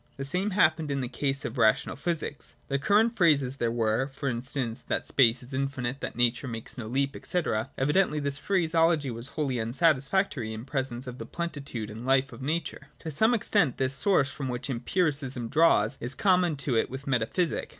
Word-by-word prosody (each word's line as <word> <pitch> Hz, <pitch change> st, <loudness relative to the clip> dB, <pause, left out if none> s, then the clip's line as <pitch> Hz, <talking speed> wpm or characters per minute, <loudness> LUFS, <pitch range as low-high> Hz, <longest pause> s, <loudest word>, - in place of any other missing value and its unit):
The 135 Hz, -, -4 dB
same 180 Hz, +8 st, 0 dB
happened 175 Hz, -6 st, +2 dB
in 140 Hz, -1 st, -1 dB
the 125 Hz, -, -2 dB
case 135 Hz, +2 st, -2 dB
of 120 Hz, +2 st, -4 dB
Rational 110 Hz, -1 st, +3 dB
Physics. 155 Hz, 0 st, -3 dB
The 140 Hz, 0 st, 0 dB
current 220 Hz, -, +3 dB
phrases 140 Hz, -, +3 dB
there 120 Hz, -, 0 dB
were, 115 Hz, +2 st, +1 dB
for 140 Hz, 0 st, -6 dB
instance, 125 Hz, 0 st, -3 dB
that -, -, -1 dB
space 125 Hz, -2 st, +3 dB
is 125 Hz, +3 st, -11 dB
infinite, 135 Hz, -1 st, -2 dB
that -, -, -4 dB
Nature 120 Hz, +2 st, +1 dB
makes 115 Hz, -2 st, -6 dB
no 115 Hz, -4 st, -6 dB
leap, 135 Hz, +3 st, 0 dB
&c. 180 Hz, -, 0 dB, 0.4 s
Evidently 150 Hz, +3 st, +2 dB
this 140 Hz, 0 st, -2 dB
phraseology 165 Hz, -6 st, +2 dB
was 115 Hz, +2 st, -4 dB
wholly 135 Hz, -5 st, 0 dB
unsatisfactory 140 Hz, -, +1 dB
in 110 Hz, +2 st, -7 dB
presence 130 Hz, -2 st, -3 dB
of 125 Hz, 0 st, -8 dB
the -, -, -7 dB
plenitude 140 Hz, -10 st, -5 dB
and 110 Hz, +2 st, -8 dB
life 135 Hz, 0 st, +2 dB
of -, -, -10 dB
nature. 150 Hz, 0 st, -3 dB
38.] -, -, -37 dB
To 160 Hz, -, -4 dB
some 220 Hz, -, +3 dB
extent 200 Hz, -, +1 dB
this 130 Hz, 0 st, 0 dB
source 145 Hz, -2 st, +2 dB
from 135 Hz, -3 st, -5 dB
which 125 Hz, +2 st, -4 dB
Empiri 150 Hz, +7 st, +1 dB
cism 130 Hz, -4 st, -3 dB
draws 135 Hz, -7 st, +3 dB
is 120 Hz, +2 st, -4 dB
common 180 Hz, -5 st, +3 dB
to 140 Hz, -3 st, -2 dB
it 115 Hz, -, +1 dB
with 135 Hz, +2 st, -7 dB
metaphysic. 135 Hz, +7 st, 0 dB
135 Hz, 195 wpm, -28 LUFS, 125-160 Hz, 0.4 s, Rational